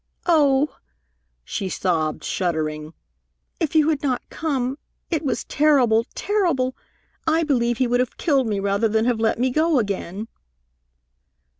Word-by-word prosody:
"Oh!" 295 -4 +3 0.7
she 195 - -3
sobbed, 160 -5 -1
shuddering. 155 -3 -2 0.6
"If 325 -2 -1
you 310 -1 +5
had 300 -3 0
not 260 -4 -1
come! 275 -3 -2 0.3
It 320 -2 0
was 280 - -1
terrible, 255 -7 +3
terrible! 335 -12 0 0.5
I 320 +1 +3
believe 240 -6 +1
he 260 - +2
would 245 0 +1
have 250 -1 -1
killed 275 -7 +2
me 205 -2 -1
rather 200 +3 +1
than 220 +1 +1
have 240 -2 +1
let 220 0 +1
me 255 +2 +1
go 315 +2 +2
again." 200 -1 -2
250 Hz, 140 wpm, -22 LUFS, 215-300 Hz, 0.7 s, you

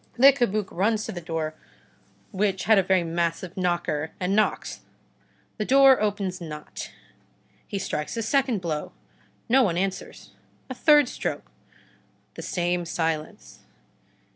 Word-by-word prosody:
Le 270 +3 +8
Cabuc 215 -6 0
runs 215 +4 0
to - - -5
the 175 - -6
door, 160 -2 -3 0.8
which 195 -2 0
had 220 -2 +5
a - - +5
very 185 -1 +2
massive 170 +1 -2
knocker, 175 -4 -1
and 185 +2 0
knocks. 215 0 0 0.8
The 215 - -2
door 270 0 +6
opens 200 -3 -2
not. 150 -2 -7 0.8
He 200 - -4
strikes 150 +1 -3
a 230 - -1
second 250 -3 +1
blow. 155 -4 -4 0.5
No 260 +3 +5
one 180 -8 +1
answers. 190 +1 -4 0.4
A - - -1
third 295 +1 +5
stroke. - - -5 0.8
The - - -8
same 175 -1 -1
silence. 160 -2 -3
190 Hz, 135 wpm, -25 LUFS, 170-220 Hz, 0.8 s, Le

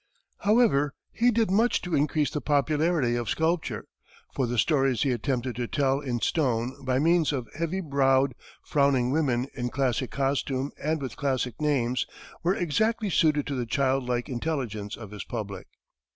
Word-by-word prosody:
However, 205 - +3 0.2
he 240 +2 +3
did 225 -4 +2
much 225 +5 +3
to 180 -2 -4
increase 150 +1 +1
the 150 - -3
popularity 150 -2 +1
of 120 -3 -2
sculpture, 160 +1 -1 0.5
for 130 -3 0
the 120 +1 -2
stories 135 -2 +2
he 135 - +1
attempted 125 0 -1
to 120 -1 -2
tell 135 0 +1
in 125 -5 -2
stone 130 -3 0
by 130 -1 +1
means 165 +2 +3
of 130 -5 -3
heavy 165 +4 -2
browed, 140 -3 +2 0.3
frowning 140 -4 +2
women 130 -5 +1
in 125 -1 -3
classic 130 -1 0
costume 135 0 -1
and 155 +2 0
with 130 - -6
classic 130 -3 -1
names, 130 -5 +1 0.3
were 180 +3 +2
exactly 215 +6 0
suited 150 -3 +3
to 145 - -3
the 125 -3 -2
child 135 0 +1
like 120 -1 -1
intelligence 120 -7 -3
of 110 -3 -10
his 105 - -6
public. 100 -6 -6
140 Hz, 165 wpm, -27 LUFS, 125-155 Hz, 0.5 s, However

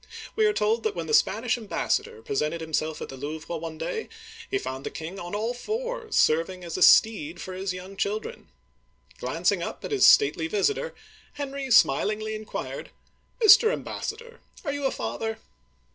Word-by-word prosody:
We 435 -1 +4
are - - +4
told 225 - +1
that; 215 -1 -1
when 170 -1 -3
the 155 - -3
Spanish 225 +9 +2
ambassador 200 - -2
presented 150 +6 -1
himself 160 -1 -2
at - - -8
the 135 - -7
Louvre 155 +5 -5
one 160 -1 -6
day, 450 - -4 0.4
he 400 - +1
found 130 - -5
the - - -3
king 165 +5 -7
on 175 +3 -5
all 225 +3 -1
fours, 455 - -4
serving 165 +4 +2
as 170 -2 0
steed 175 -7 +5
for 185 - -6
his 190 +1 -3
young 185 +2 -8
children. 215 - -3 0.7
Glancing - - 0
up - - -5
at - - -6
his 415 - +5
stately 415 -6 +5
vis 420 +3 +2
itor, 485 +3 -5 0.4
Henry 280 -1 -5
smilingly 215 - +3
inquired: 215 0 -6 0.3
" - - -39
Mr. 435 +2 +8
Ambassador, 470 -1 -5 0.3
are 285 - -1
you 285 -1 -3
.a 270 - +2
father 225 0 -3
215 Hz, 175 wpm, -26 LUFS, -, 0.7 s, Mr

